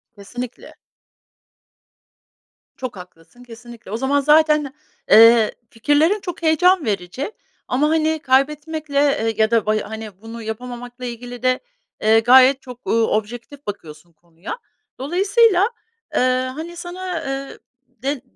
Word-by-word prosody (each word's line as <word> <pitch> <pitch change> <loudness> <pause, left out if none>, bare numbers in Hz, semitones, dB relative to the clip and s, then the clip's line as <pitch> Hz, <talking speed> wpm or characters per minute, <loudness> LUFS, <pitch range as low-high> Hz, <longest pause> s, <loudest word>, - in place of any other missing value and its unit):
Kesinlikle. 245 +4 -8 2.0
Çok 255 -5 -6
haklısın, 180 +6 -15
kesinlikle. 235 -3 -13
O 220 - -2
zaman 270 +3 +1
zaten, 300 -1 +3 0.4
eee, 225 0 +7 0.2
fikirlerin 295 - +2
çok 355 -4 -7
heyecan 330 +1 +3
verici 205 - -3 0.4
ama, 285 +4 +1
hani, 315 0 +1
kaybetmekle, 295 +2 0 0.2
eee, 225 +1 -1
ya 220 0 +2
da 230 -3 +2
bay 215 0 +1
hani, 215 -2 -9
bunu 225 +1 -9
yapamamakla 245 +2 -7
ilgili 245 0 -8
de, 255 0 +2 0.4
eee, 220 +1 +5
gayet 260 +3 +6
çok, 250 -2 -12
uuu, 225 0 +2
objektif 240 +7 -4
bakıyorsun 170 -4 -9
konuya. 170 - -9 0.4
Dolayısıyla, 390 - +3 0.5
eee, - - +3 0.4
hani, 330 +3 -7
sana, 350 0 -6
eee, 270 0 -5 0.3
de 260 +2 -4
250 Hz, 120 wpm, -20 LUFS, 225-300 Hz, 2.0 s, eee